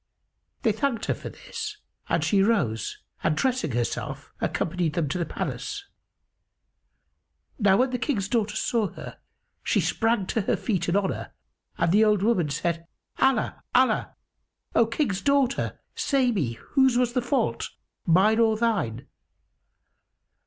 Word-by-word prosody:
They 225 - +4
thanked 230 +1 -1
her - - +1
for - - -7
this - - -7 0.3
and - - +1
she 200 -2 +3
rose 175 - +1 0.3
and 155 - +1
dressing 250 - 0
herself 120 0 -3
accompanied 170 -2 -1
them 165 -2 0
to 180 - -2
the 170 - -1
palace. 405 0 -4 1.7
Now 200 -3 +5
when 255 +1 +2
the 250 - -1
King's 210 -10 -1
daughter 215 -1 0
saw 220 -1 +1
her, - - -9 0.4
she - - +1
sprang 225 -3 +1
to 220 - 0
her 195 - 0
feet 180 -7 -1
in 170 - +1
honour, 200 -1 -1 0.4
and 170 0 +2
the 210 +4 +5
old 210 -3 +3
woman 190 -9 +2
said, 165 +3 -2 0.3
"Allah! 265 -5 +2
Allah! 255 +1 +3 0.6
O 230 - +4
King's 230 -6 -1
daughter, 275 0 +1
say 265 -3 +2
me, 150 - -1
whose 265 - +2
was 245 -1 +2
the 250 - +1
fault, 260 +3 0 0.4
mine 195 +6 +5
or 220 -1 +4
thine?" 195 - 0
215 Hz, 145 wpm, -26 LUFS, 175-245 Hz, 1.7 s, Now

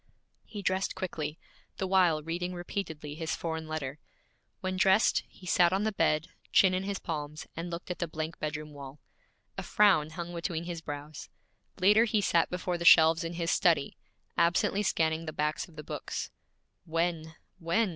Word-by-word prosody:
He 205 -2 -7
dressed 190 +1 0
quickly, 165 -5 -4 0.4
the 190 - -1
while 180 -5 +3
reading 175 +3 -3
repeatedly 160 -4 -5
his 160 +1 -3
foreign 160 -1 -4
letter. 150 -2 -4 0.6
When 185 0 -2
dressed, 190 +3 +4
he 185 - -16
sat 175 -1 +4
on 190 +2 +1
the 220 - +1
bed, 155 -5 +1 0.2
chin 190 -2 +5
in 185 +1 -1
his 200 -1 -2
palms, 150 -3 -5
and 170 +2 -4
looked 170 +1 -5
at 180 - -5
the 170 - -1
blank 160 +1 -5
bedroom 150 0 -4
wall. 140 0 -10 0.6
A - - -2
frown 190 -8 +4
hung 170 +2 -6
between 170 -1 -3
his 170 -1 -5
brows. 145 -1 -7 0.5
Later 210 +5 +6
he 220 -2 +1
sat 170 -4 +2
before 180 -1 -2
the - - -3
shelves 165 0 +7
in 165 +1 -4
his 170 0 -1
study, 160 -6 +2 0.4
absently 170 +4 +2
scanning 160 -4 0
the 155 - -4
backs 150 +1 -1
of 170 - -19
the 150 - -7
books. - - -5 0.5
'When? 165 -1 -1 0.2
When?' 190 +6 +1
170 Hz, 175 wpm, -30 LUFS, 155-185 Hz, 0.6 s, shelves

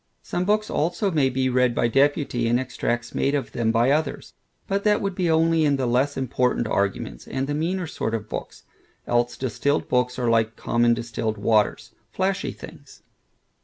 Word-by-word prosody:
Some 180 - -2
books 215 +2 +1
also 175 +5 0
may 145 -5 +2
be 130 +1 0
read 125 -1 +2
by 120 - +2
deputy, 135 -2 +1
and 120 +1 +2
extracts 120 -2 -3
made 140 +1 +1
of 135 -4 -3
them 115 -2 0
by 120 +3 +3
others; 150 -1 -1 0.3
but 200 0 -1
that 210 -1 +3
would 195 -1 -2
be 180 -2 0
only 165 0 +3
in 145 -2 +3
the 135 -2 -1
less 130 +4 +1
important 125 -2 0
arguments, 100 - -2
and 135 0 -2
the 145 - -3
meaner 175 +5 -1
sort 115 -7 -3
of 110 -1 -5
books, - - -7 0.4
else 120 0 0
distilled 140 +3 -1
books 125 0 +1
are 125 -1 -1
like 115 -1 +2
common 120 +1 +2
distilled 115 -2 -3
waters, 105 +1 +1 0.2
flashy 190 +1 -1
things. - - -13
130 Hz, 180 wpm, -24 LUFS, 120-160 Hz, 0.4 s, by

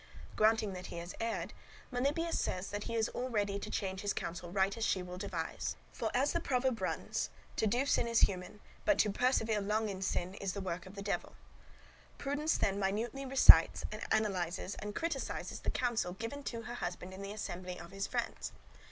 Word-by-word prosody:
Granting 215 -2 +3
that 185 0 -6
he - - -7
has 170 +1 -5
erred, 230 0 -2 0.4
Melibœus 290 +7 +1
says 185 +1 -1
that 205 0 -3
he 230 - -3
is 225 0 +2
all 255 +1 -3
ready 205 -3 0
to - - -6
change 190 -1 -2
his 205 - 0
counsel 175 +1 -4
right 195 +2 +2
as 230 - -3
she 185 -4 +2
will 180 0 -7
devise; 185 -5 -3 0.2
for, - - -1
as 270 +4 +3
the 340 - +2
proverb 255 - +1
runs, 185 - -1 0.3
to 220 - +3
do 245 +6 +2
sin 240 - +2
is 230 0 +3
human, 185 +2 +1 0.2
but 310 -1 +4
to 210 - +4
persevere 225 -2 +2
long 210 +2 +1
in 190 -1 -5
sin 185 -1 -1
is 195 -1 -3
work 180 -2 -3
of 190 - -11
the 200 - -5
Devil. 200 - -2 0.8
Prudence 290 +3 0
then 200 0 +1
minutely 225 +7 -1
recites, 265 0 +8 0.3
analyses, 190 -4 0
and 210 0 -5
criticises 335 0 -2
the - - -2
counsel 235 -8 0
given 230 +8 -5
to 230 -4 -4
her 240 +2 -6
husband 180 -4 -4
in 190 - -8
the 200 0 -5
assembly 180 -3 -5
of 170 0 -10
his 195 0 -2
friends. - - -3
205 Hz, 195 wpm, -34 LUFS, 185-240 Hz, 0.8 s, recites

